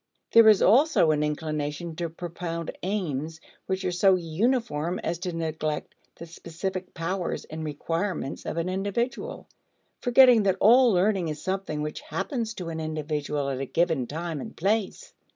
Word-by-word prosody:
There 230 -1 +8
is 210 -3 +5
also 250 - +5
an 150 -1 +1
inclination 150 +1 -3
to 170 -1 -2
propound 170 0 -5
aims 165 -6 -3 0.3
which 190 0 -2
are 180 - +1
so 185 +2 +4
uniform 180 - 0
as 170 - -2
to 180 0 -3
neglect 160 -2 -3 0.2
the 170 - -9
specific 175 +3 -6
powers 175 +2 -3
and 160 0 -7
requirements 165 +1 -3
of - - -3
an 165 +1 -1
individual, 235 - -3 0.5
forgetting 245 -2 +6
that 195 -2 +1
all 245 +3 +6
learning 190 -1 +2
is 155 -1 -4
something 185 -6 -2
which 150 - -5
happens 240 -7 -3
to 175 -3 -5
an 160 -1 -4
individual 150 -2 -2
at 130 - -3
a 135 - -2
given 160 -7 +1
time 160 0 -4
and - - -9
place. 215 - -1
175 Hz, 155 wpm, -26 LUFS, 155-200 Hz, 0.5 s, There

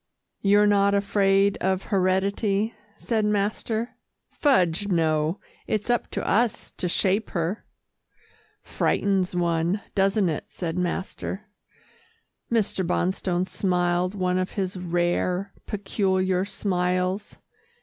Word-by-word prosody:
"You're 205 +1 +5
not 200 -1 +4
afraid 200 0 +3
of 190 0 0
heredity?" 195 +3 +1 0.2
said 220 0 -1
master. 210 +3 -1 0.3
"Fudge, 200 - +2
no 160 -2 +1 0.3
it's 215 +2 0
up 240 - 0
to - - -4
us 230 +2 +1
to 180 - -3
shape 195 +4 +1
her." 170 +6 -2 1.0
"Frightens 190 -3 0
one, 170 +3 +1
doesn't 195 0 +2
it," 155 -3 -2
said 170 -3 -4
master. 185 +3 -3 1.1
Mr. 215 -4 +1
Bonstone 180 0 0
smiled 180 0 0
one 185 -1 0
of 185 - -3
his 190 -2 -2
rare, 180 +2 -1
peculiar 190 -2 0
smiles. 185 -1 -1
190 Hz, 105 wpm, -25 LUFS, 180-205 Hz, 1.1 s, You're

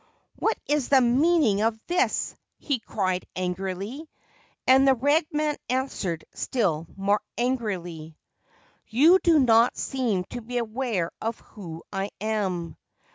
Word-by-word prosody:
4 - - 0
What - - -1
is 295 -3 0
the 275 - +6
meaning 255 - +3
of 220 0 +1
this? 355 +1 0
' - - -54
he 280 -4 -1
cried 185 -4 -2
angrily; 190 - -4 0.6
and 265 +1 +6
the 265 - +6
red 290 +6 +2
man 300 -1 0
answered 245 -10 -2
still 170 -10 -1
more 200 +2 +1 0.2
angrily: 180 -11 -3 0.4
' - - -32 0.3
You 310 +11 +5
do 335 -3 +4
not 235 -3 +4
seem 235 -9 -1
to 245 - -5
be 245 +2 -5
aware 225 -6 -1
of 225 +1 -3
who 170 -6 -10
I 195 +1 -2
am. 195 -6 -2
230 Hz, 140 wpm, -26 LUFS, 190-265 Hz, 0.6 s, the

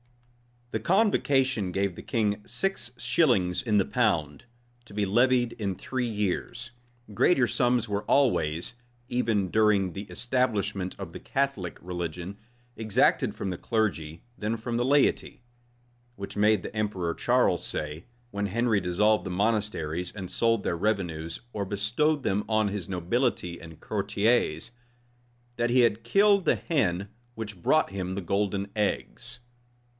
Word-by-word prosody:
The 110 - -1
convocation 135 - +2
gave 95 -1 0
the - - -8
king 105 -3 0
six 195 -12 -3
shillings 110 - +2
in 105 -3 +1
the 100 - +3
pound, 85 - 0 0.4
to 105 - -14
be 105 -1 +1
levied 120 +4 +3
in 100 -4 -3
three 125 +5 -3
years. 110 +3 -2 0.4
Greater 130 - +4
sums 120 -1 +1
were 100 0 -1
always, 85 - +1 0.4
even 110 -6 +1
during 105 -2 +3
the 100 +3 -6
establishment 105 -2 -1
of - - -7
the - - -8
Catholic 135 -11 -2
religion, 90 +2 -5 0.4
exacted 110 -2 +2
from 95 - -3
the 90 - -5
clergy 85 -8 -1 0.2
than 110 +2 -1
from 115 +1 -3
the 120 - +1
laity; 140 -2 +2 0.7
which 100 -2 -7
made 105 -1 +3
the - - -7
emperor 95 -6 -1
Charles - - +2
say, 75 +2 -4 0.3
when 100 -1 -2
Henry 115 +1 +1
dissolved 105 +4 +2
the - - -3
monasteries, 90 -4 -1
and 95 -3 -6
sold 115 -2 +1
their 85 - -1
revenues, 85 -5 -2
or 100 -2 -2
bestowed 120 +10 0
them 100 +2 0
on 110 -1 +2
his 100 -3 -5
nobility 90 -1 -1
and 80 -1 -11
courtiers, 105 -2 0 0.9
that 120 0 +1
he 125 +1 +5
had 115 -1 +2
killed 200 - +4
the - - +4
hen 100 - 0 0.3
which 105 -5 -7
brought 155 - +3
him 95 -1 -3
the 100 - -3
golden 100 +2 -1
eggs. 120 +3 -2
105 Hz, 140 wpm, -27 LUFS, 95-120 Hz, 0.9 s, he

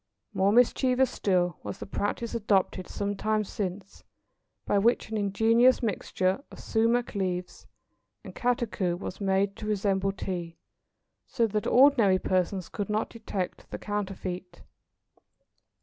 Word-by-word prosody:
More 195 +1 +3
mischievous 250 +2 +3
still 180 -3 +1
was - - -6
the - - -7
practice 205 +4 -3
adopted 200 -4 +1
some 205 0 -3
time 215 +1 0
since 195 -1 -6 0.6
by 205 - +2
which 225 +1 +1
an 220 - -1
ingenious 225 +5 +3
mixture 190 0 -1
of - - -12
sumach 230 +2 +1
leaves 180 -3 -3 0.6
and - - -9
catechu 230 -8 -1
was 185 +2 -7
made 195 0 +1
to 210 - -6
resemble 195 -2 +1
Tea, 175 -3 -5 0.7
so 235 -3 +1
that 210 -1 -2
ordinary 245 -8 +5
persons 185 0 -1
could 205 -2 -5
not 215 +1 -1
detect 205 -5 -5
the - - -5
counterfeit. 190 -3 -5
200 Hz, 130 wpm, -28 LUFS, 190-225 Hz, 0.7 s, ordinary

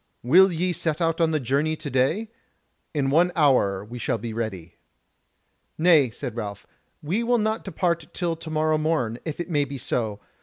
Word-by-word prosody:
Will 180 +10 +6
ye 175 +2 0
set 160 -1 -1
out 165 0 0
on 165 - +4
the 155 -1 0
journey 140 +5 0
to 155 -1 -8
day? 135 - +1 0.6
In 140 -3 0
one 175 +4 +4
hour 105 - +2
shall 115 - -1
we - - -14
be 115 -2 -4
ready." 95 -7 -5 1.0
"Nay," 155 -6 +5
said 120 +1 -6
Ralph, 105 -4 -6 0.4
"we 180 +10 0
will 240 +1 +2
not 220 0 -1
depart 170 -5 -2
till 170 -3 -2
tomorrow 155 -1 0
morn, 150 -8 0
if 155 -1 -5
it 175 +1 -4
may 145 -2 +2
be 140 0 -6
so. 110 -4 -2
155 Hz, 180 wpm, -24 LUFS, 125-170 Hz, 1.0 s, Will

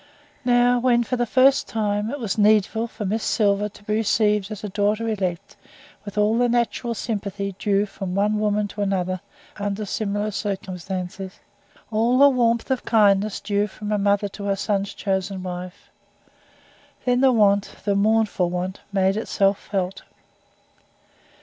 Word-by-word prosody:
Now, 245 0 +4
when 240 -1 +3
for 250 - -2
the 240 -1 -1
first 265 +3 +4
time 210 -1 -1
it 285 - -4
was 220 -6 -2
needful 215 +1 +3
for 215 -2 -6
Miss 215 +3 -1
Silver 205 -1 +1
to 205 - -17
be 210 - -2
received 210 -2 +1
as 215 -2 -7
a 210 - -3
daughter 210 +3 0
elect, 195 -2 -3 0.5
with 205 0 -8
all 210 +2 +3
the 245 0 +3
natural 235 0 0
sympathy 200 -3 -4
due 200 0 +2
from 195 -2 -6
one 210 +2 +1
woman 210 0 +1
to 205 - -6
another 185 -2 -1 0.4
under 205 +1 -3
similar 205 +1 -2
circumstances, 190 -2 -5 0.5
all 230 +3 +2
the 280 +1 +8
warmth 235 -1 +1
of 260 - 0
kindness 205 -2 +3
due 205 0 0
from 210 +1 -7
a 210 - +1
mother 200 0 +2
to 200 +1 -8
her 200 -1 +1
son's 200 0 -1
chosen 190 -1 -2
wife 180 +1 -7 1.1
then 250 0 +2
the 265 -1 +5
want, 205 -4 +2
the 200 - +2
mournful 205 -3 +2
want, 180 +2 -3
made 195 -1 +2
itself 200 -2 +1
felt. 190 -1 -3
205 Hz, 155 wpm, -23 LUFS, 195-225 Hz, 1.1 s, the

